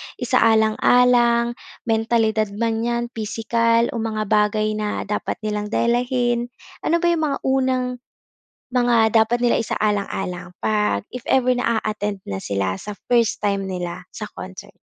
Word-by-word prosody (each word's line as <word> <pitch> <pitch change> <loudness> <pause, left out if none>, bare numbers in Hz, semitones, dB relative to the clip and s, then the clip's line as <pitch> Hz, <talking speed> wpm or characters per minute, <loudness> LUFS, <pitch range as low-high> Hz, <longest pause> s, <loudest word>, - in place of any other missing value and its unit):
isaalang-alang, 235 +1 +3 0.2
mentalidad 225 -1 +1
man 225 +1 -1
'yan, 235 0 0
pisikal, 230 +1 +1
o 235 - -4
mga 220 -1 -2
bagay 215 0 +2
na 210 -1 -2
dapat 210 +1 -3
nilang 210 -1 -2
dalahin? 240 +1 +1 0.4
Ano 340 +2 +1
ba 345 - +4
yung 320 -2 0
mga 280 - -2
unang 260 -1 +1 0.8
mga 240 -3 +3
dapat 240 +2 -1
nila 240 -1 +3
isaalang-alang 200 -5 -2
'pag 210 - +1
if 250 -2 -8
ever 255 -1 +3
na 235 -2 +1
a-attend 210 -2 -3
na 95 - -3
sila, 95 -2 -2
sa 210 - -7 0.2
first 235 -2 +2
time 200 -1 0
nila 180 -2 -5
sa 215 - -6
concert? 190 +2 -9
225 Hz, 135 wpm, -21 LUFS, 210-240 Hz, 0.8 s, ba